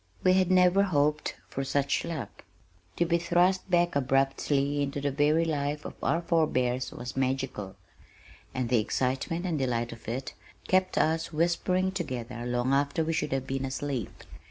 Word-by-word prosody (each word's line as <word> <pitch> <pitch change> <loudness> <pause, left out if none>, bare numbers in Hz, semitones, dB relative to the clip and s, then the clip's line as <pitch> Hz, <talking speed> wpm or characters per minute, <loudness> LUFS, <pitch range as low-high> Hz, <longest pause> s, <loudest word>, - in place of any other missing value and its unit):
We 185 - +5
had 185 -1 +3
never 185 +1 +5
hoped 150 -5 +1
for 135 - -4
such 140 +1 0
luck. 165 -4 -6 0.5
To 170 - +2
be 170 0 +2
thrust 180 +3 +2
back 175 -2 +2
abruptly 135 +1 +1
into 140 0 -2
the 140 0 -1
very 150 +4 +3
life 150 -1 -2
of - - -6
our 170 +1 +1
forebears 130 -7 +1
was 120 +1 -7
magical, 130 -7 -2 0.8
and 125 -2 -2
the 125 -2 +4
excitement 130 - -1
and 165 -5 -1
delight 120 -3 -1
of 115 - -12
it 125 +2 -4 0.3
kept 185 0 +2
us 160 +1 +1
whispering 175 +3 +1
together 125 -9 -4
long 125 +2 0
after 140 +3 +1
we 165 - -1
should 150 -2 -1
have 135 -1 -1
been 135 0 -3
asleep. 135 -3 -4
145 Hz, 160 wpm, -28 LUFS, 130-170 Hz, 0.8 s, We